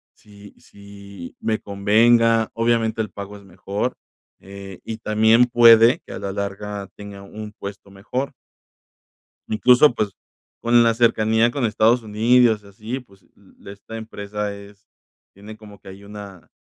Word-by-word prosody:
si 100 -1 -16
si 100 -2 -13
me 110 -1 -1
convenga, 115 +3 +3
obviamente 115 -1 0
el 110 - -4
pago 100 0 -9
es 100 - -17
mejor, 100 +5 -4 0.4
eh, 95 -1 -11
y 110 - -5
también 110 +2 +3
puede 115 -1 +6
que - - -10
a - - -6
la 100 - -4
larga 100 0 -5
tenga 100 -1 -10
un 105 +1 -9
puesto 100 -1 -10
mejor. 125 +8 -4 1.2
Incluso, 125 +6 +4
pues, 105 -3 -2 0.5
con 120 0 +4
la 115 0 +3
cercanía 115 0 +2
con 135 -1 -2
Estados 115 +2 +2
Unidos 110 +1 +2
y - - -16
así, 110 +6 -6
pues, 100 -6 -24 0.3
l 100 - -11
esta 100 +3 -10
empresa 105 -2 -5
es 100 +1 -15 0.5
tiene 105 +2 -12
como 105 -2 -15
que 95 - -14
ahí 95 +1 -13
una 100 -3 -11
105 Hz, 150 wpm, -21 LUFS, 100-115 Hz, 1.2 s, puede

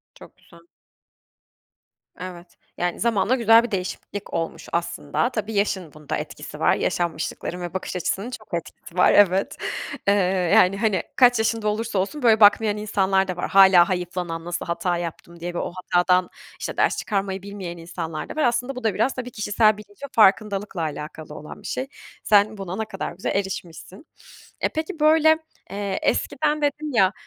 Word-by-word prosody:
Çok - - -15
güzel. 170 - -19 1.6
Evet. 180 -1 -9 0.2
Yani 175 0 -2
zamanla 230 +1 +2
güzel 230 -1 +6
bir 240 - -5
değişiklik 195 +1 -5
olmuş 165 0 -3
aslında. 170 +4 -1
Tabii 220 -3 -4
yaşın 190 -5 -1
bunda 150 -1 -4
etkisi - - -8
var. - - +3
Yaşanmışlıkların 175 +1 -2
ve 175 -1 -5
bakış 190 0 -4
açısının 190 +5 -2
çok 220 -6 -10
etkisi 170 0 -6
var 180 - +6
evet. 195 -1 +4 0.5
Eee, 200 - +6 0.4
yani 185 +2 +5
hani 210 -2 +1
kaç 245 -2 +5
yaşında 220 -1 0
olursa 210 -1 -1
olsun 280 +11 -3
böyle 225 -2 +5
bakmayan 210 0 +5
insanlar 195 -2 +1
da 185 - -3
var. - - -3
Hâlâ 190 -3 +7
hayıflanan 180 -2 -3
"nasıl 175 0 -4
hata 175 +1 -1
yaptım" 170 0 -7
diye 175 +1 -5
ve - - -4
o - - -3
hatadan 180 0 +2 0.3
işte - - -5
ders - - +2
çıkarmayı 195 -2 -2
bilmeyen 195 -3 -7
insanlar 165 -2 -6
da - - -7
var. 310 - 0
Aslında 245 +2 0
bu 255 - -7
da 220 -3 +1
biraz 225 +7 +1
tabii 250 -1 -6
kişisel 215 0 +2
bilinç 210 +4 -15
ve - - -3
farkındalıkla 205 -4 +2
alakalı 155 0 -6
olan 150 - -10
bir - - -8
şey. 260 - -3 0.4
Sen 210 +1 +4
buna 190 -2 -5
ne 220 - -2
kadar 195 -3 -5
güzel 185 +2 -3
erişmişsin. 190 - -5 0.6
E, - - +2
peki, 320 +2 -4
böyle, 315 +1 +5 0.3
eee, 200 -1 -3
eskiden 300 0 0
dedin 295 +1 -1
ya, 195 -4 +4
195 Hz, 170 wpm, -23 LUFS, 175-220 Hz, 1.6 s, Hâlâ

